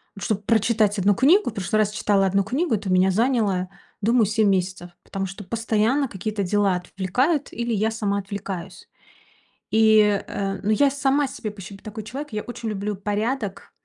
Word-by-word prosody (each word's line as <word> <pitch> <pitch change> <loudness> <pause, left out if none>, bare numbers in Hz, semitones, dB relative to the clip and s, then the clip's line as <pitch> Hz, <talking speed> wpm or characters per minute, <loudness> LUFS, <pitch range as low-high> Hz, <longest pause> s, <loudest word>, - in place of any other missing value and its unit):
вот, 195 - -8
чтобы 210 -2 -1
прочитать 220 -1 +2
1 200 +1 +3
книгу, 315 - +4
в 225 - -9
прошлый 195 +1 -1
раз 210 -1 +2
читала 200 -2 +2
1 195 +1 +1
книгу, 265 - 0
это 200 -2 -4
у - - +2
меня 185 +1 +4
заняло, 210 -4 +1 0.3
думаю, 230 0 +3
7 215 0 +2
месяцев, 185 -2 -1
потому 195 0 -4
что 195 +2 -8
постоянно 230 +6 0
какие-то 205 -1 -3
дела 200 0 +2
отвлекают 245 - -1
или 235 0 -2
я 220 +1 +1
сама 205 -3 -1
отвлекаюсь. 190 -2 -7 0.8
И, 220 0 +5 0.3
э, 195 -1 -3
ну, 205 - 0
я 275 +6 +4
сама 280 0 +1
себе, 225 -4 -6
в 205 - -13
общем, 195 0 -9
такой 215 +2 -8
человек. 265 +6 -7
Я 210 - -2
очень 235 -2 -6
люблю 205 0 -3
порядок 205 +1 -3
210 Hz, 180 wpm, -23 LUFS, 195-230 Hz, 0.8 s, И